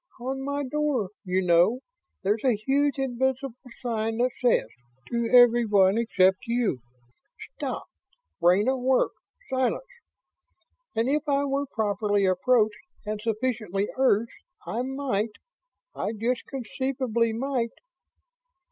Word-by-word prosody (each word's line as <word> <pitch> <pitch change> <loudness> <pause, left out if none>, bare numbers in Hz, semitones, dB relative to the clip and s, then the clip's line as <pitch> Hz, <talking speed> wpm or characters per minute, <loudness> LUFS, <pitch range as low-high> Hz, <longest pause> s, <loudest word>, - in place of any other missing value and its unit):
"On 265 +2 -4
my 285 +1 -2
door, 275 -7 -1
you 185 -1 0
know, 180 +8 +4 0.4
there's 210 +3 0
a 255 -4 +3
huge 275 +6 +1
invisible 265 0 -1 0.3
sign 225 -2 -1
that 250 +1 +2
says, 245 - +3 0.5
to 235 -1 0
everyone 230 -5 +5
except 190 -5 +3
you, 235 - 0 0.6
'STOP! - - -5 0.6
BRAIN 180 +5 +4
AT 260 0 +1
WORK! 255 +1 +2 0.4
SILENCE!', 260 - 0 1.1
and 225 +2 +1
if 295 +2 0
I 280 0 +2
were 280 0 -1
properly 205 -3 0
approached 210 +3 +2 0.3
and 210 0 -3
sufficiently 215 -3 -1
urged, 235 -4 +2 0.3
I 235 - -2
might... 255 -5 -2 0.6
I 215 - -2
just 235 +3 -2
conceivably 255 -2 -1
might 240 0 -2
235 Hz, 115 wpm, -26 LUFS, 210-265 Hz, 1.1 s, everyone